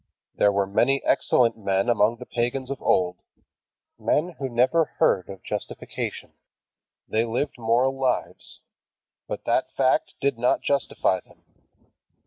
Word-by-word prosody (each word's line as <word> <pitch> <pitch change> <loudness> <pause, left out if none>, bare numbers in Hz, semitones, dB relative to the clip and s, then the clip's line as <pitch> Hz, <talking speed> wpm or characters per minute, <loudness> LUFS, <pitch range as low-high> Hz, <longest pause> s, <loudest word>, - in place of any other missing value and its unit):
There 100 - +3
were 100 0 +1
many 135 +8 +2
excellent 115 -2 +3
men 100 0 0
among 115 -1 +3
the - - -9
pagans 125 +3 -2
of 140 - -5
old, 90 -1 +2 0.8
men 170 +4 +1
who 135 -1 -2
never 130 +7 +3
heard 90 -2 +2
of 95 -1 -9
justification. - - -5 0.8
They 110 +1 +1
lived 125 +4 -2
moral 120 +4 +2
lives. 130 -2 -2 0.7
But - - -5
that - - +1
fact - - +1
did 140 -4 0
not 125 - +2
justify 140 -8 +1
them. - - -23
120 Hz, 130 wpm, -25 LUFS, 100-135 Hz, 0.8 s, There